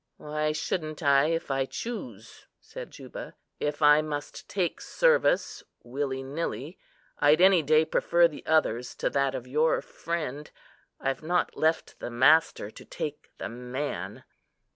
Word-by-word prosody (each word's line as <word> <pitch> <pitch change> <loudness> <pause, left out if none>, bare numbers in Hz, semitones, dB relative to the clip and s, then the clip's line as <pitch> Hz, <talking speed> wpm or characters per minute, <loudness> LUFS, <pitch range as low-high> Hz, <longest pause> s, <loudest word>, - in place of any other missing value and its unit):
"Why 150 0 -2
shouldn't 155 +1 -3
I, 140 0 +5
if 165 -2 -1
I 135 0 0
choose?" 125 - -7
said - - -9
Juba. - - -9 0.2
"If 150 +1 -2
I 150 +1 +7
must 145 -1 -6
take 185 -4 -1
service, - - +2 0.2
willy 135 +1 -3
nilly, 145 - -4 0.4
I'd 150 +2 +5
any 185 -1 +6
day 155 +1 +4
prefer 170 +2 +3
the 155 - -10
other's 125 -6 +1
to - - -1
that 140 -1 +1
of 125 - -5
your 150 +5 +2
friend. 150 -3 -5 0.5
I've 135 0 -2
not 175 +3 0
left 160 +1 0
the - - -5
master 130 -2 +3
to - - -12
take 150 -1 -6
the - - -4
man." 125 +4 -5
150 Hz, 140 wpm, -28 LUFS, 135-160 Hz, 0.5 s, I